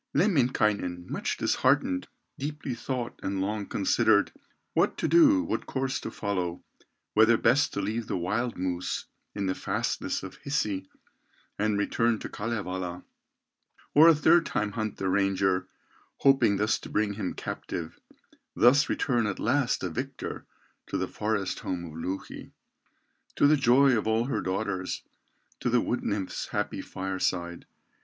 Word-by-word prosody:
Lemminkainen, 120 - +1
much - - -2
disheartened, 90 0 +1 0.3
Deeply 145 -2 -4
thought 120 +1 -4
and 95 0 -2
long 100 +1 -2
considered, 105 +1 +3 0.4
What - - +2
to - - 0
do, 300 -4 +6
what - - -3
course 135 0 -1
to - - -5
follow, 90 -4 -3 0.5
Whether 110 +2 +5
best 135 +6 +3
to 100 - -1
leave 110 +3 -2
the - - -1
wild 115 +7 -1
moose 90 -1 -2 0.3
In 100 -1 -2
the 95 - +1
fastnesses - - -2
of 95 - -8
Hisi, 105 -9 -2 0.7
And 105 0 +1
return 115 +3 +1
to - - -7
Kalevala, 95 -5 -4 0.9
Or 155 +3 +8
a 165 - +8
third 165 +3 +5
time 105 0 -1
hunt 110 0 -3
the 95 - -2
ranger, 95 -1 +1 0.5
Hoping 125 -7 +4
thus 105 +2 +1
to - - -10
bring 105 -1 0
him 100 -3 -4
captive, 80 -1 -5 0.6
Thus 140 +4 +5
return 120 -4 +1
at 100 - -3
last 130 0 +1
a 95 - -1
victor - - -5 0.4
To - - -2
the - - -1
forest 105 -3 -2
home 90 -1 -4
of 80 - -9
Louhi, 90 +4 -6 0.8
To - - +4
the 150 +2 +6
joy 135 -1 +5
of 110 - -1
all 110 +1 +2
her 135 - -1
daughters, 95 -1 -2 0.6
To - - -1
the 120 0 +4
wood 120 - -1
nymph's 100 -3 -2
happy - - -2
fireside. 95 -2 -3
105 Hz, 150 wpm, -28 LUFS, 95-125 Hz, 0.9 s, Or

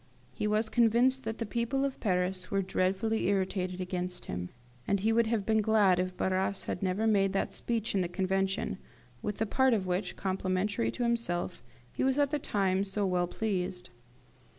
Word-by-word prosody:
He 210 - -2
was 215 +1 +1
convinced 240 +3 +3
that 225 0 -3
the 230 - -2
people 235 +5 0
of 275 - -3
Paris 185 -2 0
were 195 -1 +1
dreadfully 190 +4 0
irritated 185 -2 0
against 180 -1 -3
him, 90 0 -4 0.4
and 200 - +2
he 220 +3 +2
would 230 0 +3
have 220 -3 0
been 220 0 +3
glad 205 -4 +4
if 185 0 -2
Barras 190 +1 0
had - - -4
never 195 +3 0
made 195 -3 +3
that 195 - -1
Speech 230 -2 -2
in 195 - +2
the 175 - 0
Convention, 195 +2 -1 0.4
with 210 -1 -3
the 220 - 0
part 260 +2 +3
of 195 -3 -1
which, 185 +2 -2
complimentary 185 - -1
to 240 - -3
himself, 205 -7 -1 0.3
he - - -1
was 265 +1 +2
at 285 -1 +2
the 300 - 0
time 195 -5 +1
so 200 +1 -1
well 180 -2 +1
pleased. 180 - -3
195 Hz, 185 wpm, -30 LUFS, 185-225 Hz, 0.4 s, glad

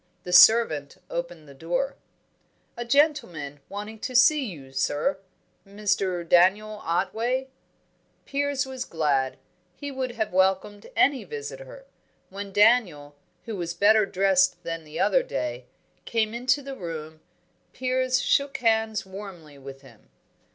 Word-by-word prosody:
The 180 - -5
servant 180 -9 +6
opened 170 -2 -5
the 140 - -13
door. 175 - -2 0.8
"A 240 - -4
gentleman 235 - 0
wanting 210 +2 -7
to 255 +3 -5
see 280 +3 +5
you, 145 - -9
sir 145 - -1 0.4
Mr. 195 -3 -2
Daniel 205 +5 +3
Otway." 230 +10 -1 0.8
Piers 285 0 -1
was 260 -1 -5
glad. 145 - -1 0.4
He 285 +6 -7
would 260 -2 -4
have 220 -5 -3
welcomed 190 +2 +1
any 275 -1 +3
visitor. - - -8 0.5
When 200 +1 -7
Daniel 195 -10 +3 0.3
who 225 - -5
was 170 -3 -4
better 215 0 +4
dressed 195 +9 +2
than 165 -1 -5
the 155 +1 -8
other - - +3
day 125 - -4 0.4
came 225 -1 0
into 255 +4 0
the 270 0 -7
room, 160 -5 -7 0.5
Piers 255 0 0
shook 280 0 +1
hands 220 -3 +1
warmly 190 -7 -10
with 135 0 -11
him. 120 -5 -19
205 Hz, 130 wpm, -25 LUFS, 165-255 Hz, 0.8 s, servant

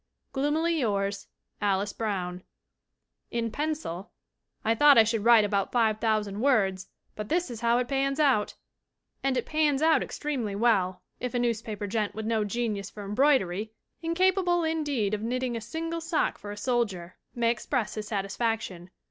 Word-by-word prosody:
"Gloomily 310 +4 +1
yours, 200 -4 -1 0.3
"ALICE 200 0 +1
BROWN." 185 -5 -3 0.9
[In 230 -1 -2
pencil] 290 - -3 0.6
"I 225 - +4
thought 290 +3 +6
I 225 - +9
should 220 -1 -1
write 230 -2 +7
about 200 -1 0
five 220 -3 +2
thousand 215 -2 0
words, 195 -9 +2 0.3
but 210 0 -6
this 345 -5 0
is 230 - -7
how 235 0 +3
it 250 0 0
pans 275 +1 0
out!" 265 -9 +2 0.7
And 270 -1 +1
it 245 - -1
pans 305 -3 +2
out 320 0 +5
extremely 255 -9 -3
well, 195 -5 +2 0.2
if 250 0 -4
a - - +3
newspaper 225 -3 -1
gent 210 0 -2
with 220 0 -4
no 220 -1 +1
genius 210 -2 -2
for 205 -1 -9
embroidery, 215 -3 +2 0.3
incapable, 350 +1 +2
indeed, 290 -10 0
of 210 - -1
knitting 250 +2 -1
a 230 - -3
single 330 +8 -4
sock 325 0 0
for 205 - -8
a 205 - -7
soldier, 205 -7 -1 0.2
may 235 -1 +2
express 235 -1 -2
his 215 -1 -5
satisfaction. 200 -3 -2
230 Hz, 160 wpm, -28 LUFS, 205-275 Hz, 0.9 s, I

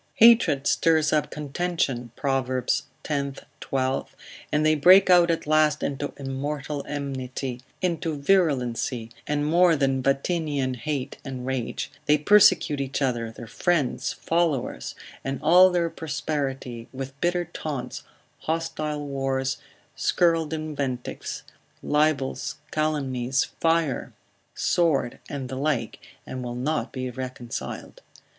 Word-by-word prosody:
Hatred 225 - +6
stirs 160 -2 +3
up 150 -1 +2
contention, 145 -5 -2
Prov. 135 -2 0
x. 130 -1 0 0.8
12, 130 0 -2 0.4
and 150 +1 +2
they 155 - +5
break 185 +5 +7
out 175 -1 +6
at 165 - 0
last 155 0 +3
into 145 +1 -2
immortal 140 +1 -4
enmity, 130 -3 -4 0.2
into 165 -3 -1
virulency, 130 -8 +1 0.2
and 145 0 0
more 170 +2 +5
than 135 -2 +1
Vatinian 140 -1 0
hate 135 +2 -4
and 130 -3 -6
rage; 130 -3 -3 0.2
they 150 - +5
persecute 180 -4 +5
each 135 0 -2
other, 120 -5 -1
their 115 - -9
friends, 140 -1 0
followers, 165 -6 -1 0.3
and 135 0 -3
all 180 +4 +7
their 175 -2 +1
posterity, 135 -6 -3
with 135 0 -6
bitter 175 0 +1
taunts, 150 -5 -5 0.4
hostile 155 -2 -2
wars, 135 -1 -1 0.4
scurrile 165 -3 +2
invectives, 145 -6 -4 0.4
libels, 150 -3 +1 0.2
calumnies, 135 -4 0 0.2
fire, 165 -5 +1 0.4
sword, 165 -8 +1
and 135 -3 -4
the 130 +1 -5
like, 145 -2 -1 0.3
and 130 -1 -5
will 120 0 -4
not 150 +6 -1
be 130 -1 -4
reconciled. 125 -1 -6
145 Hz, 115 wpm, -25 LUFS, 130-160 Hz, 0.8 s, break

